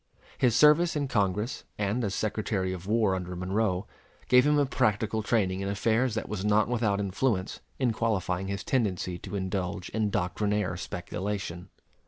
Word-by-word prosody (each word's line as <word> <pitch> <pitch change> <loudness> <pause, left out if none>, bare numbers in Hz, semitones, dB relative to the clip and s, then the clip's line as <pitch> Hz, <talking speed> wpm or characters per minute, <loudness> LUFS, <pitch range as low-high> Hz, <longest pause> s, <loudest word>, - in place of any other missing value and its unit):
His 120 -3 +3
service 155 +3 +5
in 145 -2 0
Congress 105 0 0
and 105 +4 0
as 100 -2 -1
Secretary 105 -3 -1
of 90 0 -8
War 110 -2 +2
under 90 -1 -4
Monroe 95 +1 0 0.4
gave 125 +2 +6
him 150 0 +4
a 145 - +4
practical 110 -3 0
training 100 -4 +1
in 100 0 -2
affairs 110 +4 +1
that 110 - -3
was 105 -3 -4
not 105 +1 +3
without 110 -4 +1
influence 100 0 -1 0.2
in 125 -4 +1
qualifying 95 -5 -1
his 100 0 -3
tendency 95 -8 -1
to 100 +1 -7
indulge 95 0 -3
in 110 -1 0
doctrinaire 100 +1 0
speculation. 90 0 -5
105 Hz, 160 wpm, -28 LUFS, 95-115 Hz, 0.4 s, gave